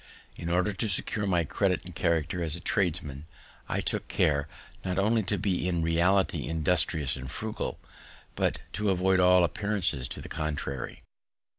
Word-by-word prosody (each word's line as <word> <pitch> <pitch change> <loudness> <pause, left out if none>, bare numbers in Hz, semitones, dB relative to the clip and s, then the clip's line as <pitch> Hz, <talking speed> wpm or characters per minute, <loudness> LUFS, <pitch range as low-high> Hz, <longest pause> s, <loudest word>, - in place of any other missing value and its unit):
In 85 - -5
order 90 +4 +2
to 105 +3 -1
secure 100 +2 +1
my 90 -3 +2
credit 90 +3 0
and 90 - -9
character 85 +1 0
as 80 -2 -1
a - - -7
tradesman, 80 - -1 0.4
I - - 0
took - - -2
care 70 -1 +2 0.4
not 90 -1 -2
only 110 +3 +3
to 105 +1 -1
be 90 -1 0
in 85 -2 0
reality 90 +4 +2
industrious 80 -3 +1
and 65 0 -7
frugal, 110 +9 -4 0.6
but - - 0
to 105 -1 0
avoid 95 0 +3
all 90 0 +6
appearances 95 -8 0
to - - -5
the - - -8
contrary. 75 -4 -4
90 Hz, 160 wpm, -29 LUFS, 80-95 Hz, 0.6 s, all